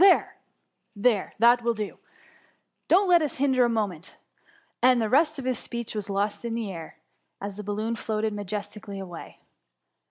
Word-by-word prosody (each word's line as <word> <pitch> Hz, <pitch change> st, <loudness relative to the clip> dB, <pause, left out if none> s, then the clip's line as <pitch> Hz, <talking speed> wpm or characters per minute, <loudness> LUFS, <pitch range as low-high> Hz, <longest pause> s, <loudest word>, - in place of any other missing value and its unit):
There! 390 Hz, -, +5 dB, 0.6 s
there, 210 Hz, -1 st, +1 dB
that 240 Hz, +2 st, +5 dB
will 235 Hz, 0 st, 0 dB
do; 210 Hz, -2 st, -5 dB, 0.9 s
dotCt 385 Hz, +3 st, +5 dB
let 350 Hz, -2 st, +6 dB
us 300 Hz, -3 st, -2 dB
hinder 265 Hz, -2 st, +3 dB
a -, -, +1 dB
mo 220 Hz, -2 st, +2 dB
ment 180 Hz, -2 st, -10 dB, 0.3 s
;" -, -, -33 dB
and 255 Hz, -1 st, +5 dB
the 220 Hz, -2 st, 0 dB
rest 305 Hz, +3 st, +4 dB
of 270 Hz, -, -6 dB
his 255 Hz, -3 st, 0 dB
speech 235 Hz, -1 st, -5 dB
was 210 Hz, -2 st, -4 dB
lost 200 Hz, +3 st, -1 dB
in 230 Hz, -1 st, -2 dB
air, 185 Hz, -10 st, -6 dB, 0.4 s
as 200 Hz, 0 st, -5 dB
the 210 Hz, -, -5 dB
balloon 215 Hz, +3 st, -2 dB
floated 220 Hz, -1 st, -2 dB
majestically 205 Hz, 0 st, -5 dB
away. 180 Hz, -3 st, -9 dB
220 Hz, 170 wpm, -26 LUFS, 205-250 Hz, 0.9 s, let